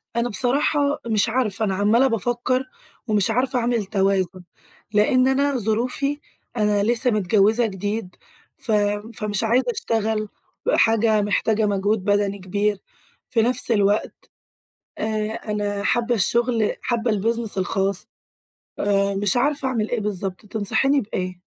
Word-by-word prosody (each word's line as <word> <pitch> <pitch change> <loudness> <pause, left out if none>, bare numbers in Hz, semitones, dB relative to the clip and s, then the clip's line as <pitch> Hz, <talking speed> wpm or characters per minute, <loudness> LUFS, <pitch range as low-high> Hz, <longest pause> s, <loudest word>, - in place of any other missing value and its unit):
أنا 235 +1 0
بصراحة، 280 +6 +1
مش 220 0 +1
عارفة، 225 -3 0
أنا 195 -2 -1
عمَّالة 220 +7 +3
بافكّر 245 +3 0 0.4
ومش 210 0 +2
عارفة 250 +2 +1
أعمل 235 -2 0
توازُن؛ 190 -2 0 0.5
لأن 255 +5 +4
أنا 275 +1 +2
ظروفي، 250 +6 -1 0.4
أنا 210 -2 +2
لسه 240 +3 +1
متجوّزة 215 +3 +3
جديد 205 -1 -4 0.4
ف 250 - -5 0.4
فمش 210 -1 -2
عايزة 240 +3 +2
أشتغل 220 -2 -1 0.4
بحاجة 225 - +3
محتاجة 210 +1 +1
مجهود 205 0 0
بدني 205 0 +1
كبير، 205 +2 -1 0.5
في 235 -3 +2
نفس 245 +1 0
الوقت 205 -1 +2 0.9
آآ - - -2 0.5
أنا 205 -1 -2
حابّة 240 +3 +1
الشغل، 230 +1 +1
حابّة 235 -1 0
الbusiness 220 +1 -1
الخاص 195 +1 -1 0.7
آآ، 200 -1 +1
مش 200 +3 0
عارفة 275 +2 +1
أعمل 225 -4 -1
إيه 240 - -1
بالضبط. 195 -1 -4
تنصحيني 225 +7 +1
بإيه؟ 185 -4 -5
220 Hz, 125 wpm, -22 LUFS, 205-240 Hz, 0.9 s, لأن